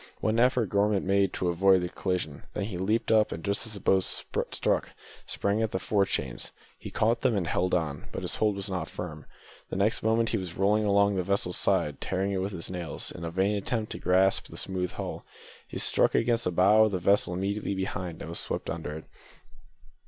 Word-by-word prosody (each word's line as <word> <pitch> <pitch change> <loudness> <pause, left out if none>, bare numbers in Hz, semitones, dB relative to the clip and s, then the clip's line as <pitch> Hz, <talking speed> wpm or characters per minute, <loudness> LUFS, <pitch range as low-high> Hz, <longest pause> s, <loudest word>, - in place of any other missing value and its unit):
One 110 +1 +1
effort 125 -3 +3
Gorman 100 -1 +2
made 100 0 +2
to 90 - -1
avoid 95 +2 +4
the 90 - -2
collision, 85 -7 -3
then 105 - -1
he 100 -3 -4
leaped 110 +5 0
up, 110 -1 +4
and 80 - -5
just 100 +3 -1
as 110 - -5
the - - -6
boat 95 0 +3
struck, - - -1 0.4
sprang 100 +2 0
at 110 - +1
the 95 - -2
fore 100 +1 +1
chains. 65 -9 -2 0.3
He - - -7
caught 115 +2 +1
them 110 - +2
and 95 - 0
held 90 +2 +1
on, 75 -5 -2
but - - -5
his - - -2
hold 105 -2 +2
was 100 +1 -3
not 90 -4 -3
firm; 80 -4 -7 0.4
the - - -4
next 100 +3 +1
moment 115 +1 +2
he - - 0
was 90 -3 -6
rolling 105 +2 +3
along 100 -1 +3
the 90 - +1
vessel's 95 -1 0
side, 85 -7 +1
tearing 95 +1 -1
it 95 -1 -1
with 95 +2 -2
his 85 -2 -4
nails 85 -4 -4
in 90 - -9
the 85 - -3
vain 95 +4 +1
attempt 110 +2 -2
to - - -4
grasp 95 +1 +2
the - - -11
smooth 90 -1 -2
hull. - - -5 0.4
He - - -6
struck - - +2
against 120 0 +2
the 90 - +1
bow 100 +5 +5
of 105 - -1
the - - +1
vessel 90 0 +2
immediately 100 +2 -2
behind 90 -3 -4
and - - -7
was 85 - -4
swept - - -4
under 80 -2 -5
it. 80 - -9
95 Hz, 220 wpm, -28 LUFS, 90-105 Hz, 0.4 s, bow